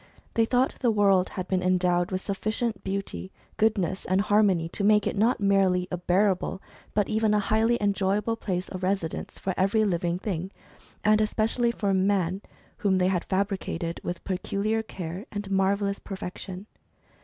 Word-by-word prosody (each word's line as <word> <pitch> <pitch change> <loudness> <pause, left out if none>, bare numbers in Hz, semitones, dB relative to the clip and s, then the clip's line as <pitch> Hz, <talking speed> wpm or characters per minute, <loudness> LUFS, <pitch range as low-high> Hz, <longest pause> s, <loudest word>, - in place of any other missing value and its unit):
They 230 - +3
thought 250 +3 +1
the 245 - +2
world 200 -4 +3
had 185 0 -5
been 185 -1 0
en 185 0 +3
dowed 175 0 +1
with 185 -2 -2
sufficient 215 +2 -2
beauty, 195 -1 -4 0.3
goodness, 205 -4 +1
and 185 +1 +2
harmony 200 -5 +3
to 200 - -3
make 210 0 +4
it - - -1
not 225 +5 +2
merely 195 -3 +2
a 180 - -1
bearable, 185 +2 +1 0.4
but 205 -2 +2
even 220 -1 +2
a - - +3
highly 220 +3 +2
enjoy 200 -1 +1
able 225 +2 -1
place 185 -5 -3
of 185 - -6
residence 185 -3 -2
for 190 - -2
every 205 +3 +2
living 175 -2 0
thing, 185 -2 -3 0.5
and 215 +1 +4
especially 225 +2 +1
for 205 -4 0
man, 190 -1 +1 0.4
whom 195 -2 +2
they 185 0 +3
had 185 -2 -1
fabricated 190 -4 -2
with 175 0 -4
peculiar 200 +3 -1
care, 185 - -7
and 205 -1 -4
a 195 - -4
marvellous 200 +1 +1
perfection. 190 0 -7
195 Hz, 170 wpm, -27 LUFS, 185-210 Hz, 0.5 s, make